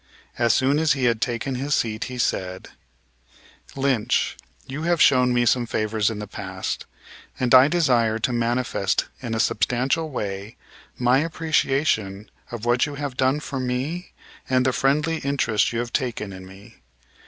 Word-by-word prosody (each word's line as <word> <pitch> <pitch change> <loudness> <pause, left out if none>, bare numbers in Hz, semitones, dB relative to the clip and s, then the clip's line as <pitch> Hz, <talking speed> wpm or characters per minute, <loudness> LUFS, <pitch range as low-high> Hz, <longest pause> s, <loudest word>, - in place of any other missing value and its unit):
As 120 -1 +4
soon 140 +3 +2
as 160 -1 +3
he 135 - -3
had 115 -2 +2
taken 120 +2 -2
his 140 +4 0
seat 110 -1 -1
he 125 -1 -7
said: 95 -5 -2 1.1
"Lynch, 135 -5 +1 0.3
you 140 +3 -6
have 170 0 +1
shown 125 -3 +5
me 120 0 +2
some 120 0 +2
favors 110 -1 0
in 110 - -5
the 105 - -5
past, 95 -2 -5 0.5
and 125 -1 +1
I 130 +1 +9
desire 125 -9 +2
to 120 +2 -1
manifest 120 -4 0 0.2
in 115 -3 -3
a - - -2
substantial 125 - +1
way 100 -5 -5 0.4
my 125 +2 +3
appreciation 140 -10 0 0.2
of 120 -1 -6
what 120 +4 +2
you 145 - -6
have 140 -2 -4
done 130 +3 +2
for 135 -2 -5
me 130 +8 -3 0.4
and 130 -1 +2
the 130 - +2
friendly 150 +5 +1
interest 125 -8 0
you 120 - -3
have 120 0 -3
taken 115 -7 -2
in 95 0 -10
me. 100 +4 -15
125 Hz, 165 wpm, -23 LUFS, 110-140 Hz, 1.1 s, I